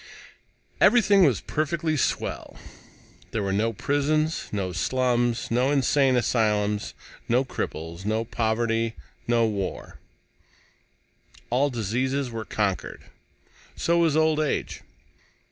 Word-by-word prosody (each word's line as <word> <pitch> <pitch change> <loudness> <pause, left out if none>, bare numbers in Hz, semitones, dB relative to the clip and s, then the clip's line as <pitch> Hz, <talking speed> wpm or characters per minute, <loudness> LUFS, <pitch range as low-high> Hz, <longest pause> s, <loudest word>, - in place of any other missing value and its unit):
Everything 205 -6 +6
was 130 -8 +2
perfectly 155 +1 -1
swell. 140 - -2 0.7
There 110 - -2
were 95 -1 -1
no 110 +3 +1
prisons, 145 +7 0
no 95 -3 -2
slums, 120 +4 0
no 125 +3 +2
insane 135 -1 +3
asylums, 105 -4 0 0.3
no 125 +3 +3
cripples, 85 -7 -5
no 110 +2 -1
poverty, 115 0 -1 0.3
no 120 -1 +3
wars. 100 -4 -4 1.6
All 135 +4 +2
diseases 125 +3 -1
were 110 -1 -5
conquered. 100 -3 -2 0.7
So 170 0 +1
was 160 -3 +3
old 160 -1 +3
age. 155 -2 -2
120 Hz, 105 wpm, -25 LUFS, 110-145 Hz, 1.6 s, Everything